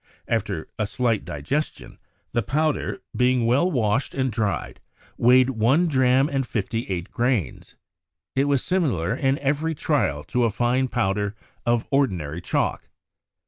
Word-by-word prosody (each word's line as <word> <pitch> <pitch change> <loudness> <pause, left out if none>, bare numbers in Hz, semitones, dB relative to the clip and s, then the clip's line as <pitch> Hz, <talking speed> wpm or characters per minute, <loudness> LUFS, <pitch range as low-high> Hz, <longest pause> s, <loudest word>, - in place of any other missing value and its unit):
After - - -2
a 105 - 0
slight 115 -1 0
digestion, 80 - -4 0.3
the 120 - +1
powder, 155 +4 -1
being 125 -1 +2
well 135 +10 +3
washed 120 - 0
and 130 -2 0
dried, 105 -2 -2 0.3
weighed 125 +2 +5
one 130 +9 +3
dram 130 -2 +3
and 135 -2 -1
fifty 115 0 -3
eight 90 0 -3
grains. 120 - -1 0.6
It 135 +1 +3
was 140 -3 +1
similar 125 - 0
in 135 0 +1
every 150 +3 -1
trial 120 - 0
to 125 +7 0
a - - +2
fine 125 +4 +1
powder 105 -3 -1 0.3
of 120 -1 +1
ordinary 90 - 0
chalk." - - -1
125 Hz, 140 wpm, -24 LUFS, 105-135 Hz, 0.6 s, weighed